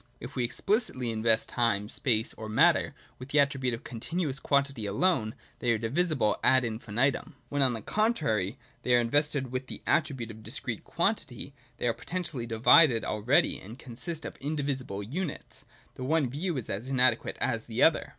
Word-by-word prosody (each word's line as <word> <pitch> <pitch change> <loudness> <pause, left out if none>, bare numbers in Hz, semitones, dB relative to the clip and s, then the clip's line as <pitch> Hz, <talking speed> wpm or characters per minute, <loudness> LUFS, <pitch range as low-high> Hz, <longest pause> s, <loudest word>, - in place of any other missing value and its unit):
If 125 +3 -9
we 125 - 0
explicitly 130 - -1
invest 110 0 +2
time, 110 -4 0
space, 110 0 +1
or 110 -1 -8
matter 110 - +3 0.2
with 125 +2 -9
the 145 - +3
attribute 135 -3 +1
of 115 - -12
Continuous 135 +4 -3
quantity 140 -7 0
alone, 110 - +1 0.2
they 120 - +1
are - - +1
divisible 130 - +1
ad 130 0 +5
infinitum. 115 +4 -1
When, 145 0 0
on 130 -2 +4
the 110 -3 -5
contrary, 150 - 0 0.2
they 125 - +3
are - - +5
invested 140 +2 +1
with 130 0 -3
the - - -9
attribute 140 -8 0
of 110 0 -12
Discrete 115 0 -5
quantity, 170 - -2 0.2
they - - -1
are 115 - +2
potentially 145 -2 -4
divided 115 +2 +5
al 105 - -2
ready, 125 +7 +3
and 110 +6 -10
consist 130 +7 -6
of - - -7
indivisible 140 -8 -3
units. 150 - -5 0.3
The 130 - -7
one 145 -2 +1
view 160 +3 -2
is 125 - -3
as 110 +7 -4
inadequate 130 -3 +2
as - - -1
the - - 0
other. - - +3
130 Hz, 175 wpm, -29 LUFS, 115-145 Hz, 0.3 s, ad